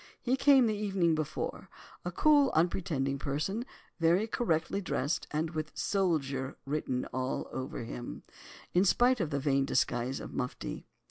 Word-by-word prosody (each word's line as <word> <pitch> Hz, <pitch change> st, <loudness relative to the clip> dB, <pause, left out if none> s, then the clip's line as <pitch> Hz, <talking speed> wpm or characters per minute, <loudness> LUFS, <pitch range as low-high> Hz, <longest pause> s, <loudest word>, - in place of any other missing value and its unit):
He 255 Hz, +1 st, +1 dB
came 270 Hz, -2 st, +6 dB
the 215 Hz, -2 st, +1 dB
evening 195 Hz, -5 st, +1 dB
before—a 155 Hz, +3 st, -5 dB
cool, 290 Hz, -, +5 dB
unpretending 155 Hz, -5 st, +1 dB
person, 155 Hz, -, -2 dB, 0.3 s
very 170 Hz, +5 st, +4 dB
correctly 200 Hz, -4 st, 0 dB
dressed, 145 Hz, -4 st, -1 dB
and 155 Hz, +1 st, -1 dB
with 155 Hz, -2 st, -4 dB
"soldier" 140 Hz, -9 st, 0 dB
written 135 Hz, -3 st, -1 dB
all 130 Hz, 0 st, -2 dB
over 130 Hz, -2 st, -4 dB
him—in 120 Hz, +9 st, -4 dB
spite 245 Hz, +5 st, +4 dB
of 170 Hz, -6 st, 0 dB
the 140 Hz, -2 st, -1 dB
vain 140 Hz, -1 st, +2 dB
disguise 125 Hz, 0 st, 0 dB
of -, -, -8 dB
mufti. 125 Hz, -, -4 dB
160 Hz, 135 wpm, -31 LUFS, 135-200 Hz, 0.3 s, came